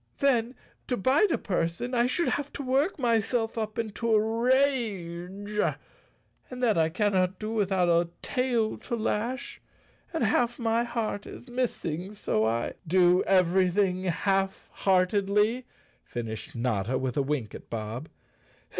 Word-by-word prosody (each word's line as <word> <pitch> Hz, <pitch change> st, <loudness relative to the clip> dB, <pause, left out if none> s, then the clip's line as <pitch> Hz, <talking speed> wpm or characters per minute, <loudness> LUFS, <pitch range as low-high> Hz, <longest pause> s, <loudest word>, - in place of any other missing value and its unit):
Then, 255 Hz, -3 st, +2 dB, 0.3 s
to 250 Hz, -, 0 dB
bite 270 Hz, -, +3 dB
a -, -, +2 dB
person 180 Hz, +6 st, -2 dB
I 240 Hz, 0 st, +3 dB
should 340 Hz, +7 st, 0 dB
have 285 Hz, 0 st, -2 dB
to 285 Hz, -, -5 dB
work 275 Hz, +8 st, +1 dB
myself 230 Hz, -2 st, +1 dB
up 215 Hz, -1 st, -3 dB
into 230 Hz, +1 st, -2 dB
a 215 Hz, -, +6 dB
rage, 210 Hz, -5 st, 0 dB, 0.9 s
and 250 Hz, 0 st, -6 dB
that 225 Hz, -4 st, +4 dB
I 160 Hz, -1 st, +3 dB
cannot 185 Hz, 0 st, +1 dB
do 215 Hz, 0 st, -4 dB
without 195 Hz, -5 st, +1 dB
a 170 Hz, 0 st, +3 dB
tail 245 Hz, -4 st, 0 dB
to 240 Hz, -, -3 dB
lash. 235 Hz, +3 st, -2 dB, 0.5 s
And 325 Hz, -7 st, -1 dB
half 235 Hz, +2 st, +2 dB
my 230 Hz, -1 st, +1 dB
heart 225 Hz, -4 st, -3 dB
is -, -, -10 dB
missing 210 Hz, -7 st, -3 dB
so 110 Hz, -, 0 dB
I—" 115 Hz, +1 st, -1 dB
"Do 180 Hz, +1 st, +5 dB
everything 185 Hz, 0 st, +3 dB
half 195 Hz, +2 st, 0 dB
heartedly," 200 Hz, +5 st, +2 dB, 0.4 s
finished 110 Hz, -3 st, -6 dB
Notta, 115 Hz, 0 st, 0 dB
with 130 Hz, -2 st, -2 dB
a 140 Hz, -, +2 dB
wink 135 Hz, -6 st, -2 dB
at -, -, -10 dB
Bob. 115 Hz, +6 st, -5 dB
210 Hz, 140 wpm, -28 LUFS, 175-240 Hz, 0.9 s, a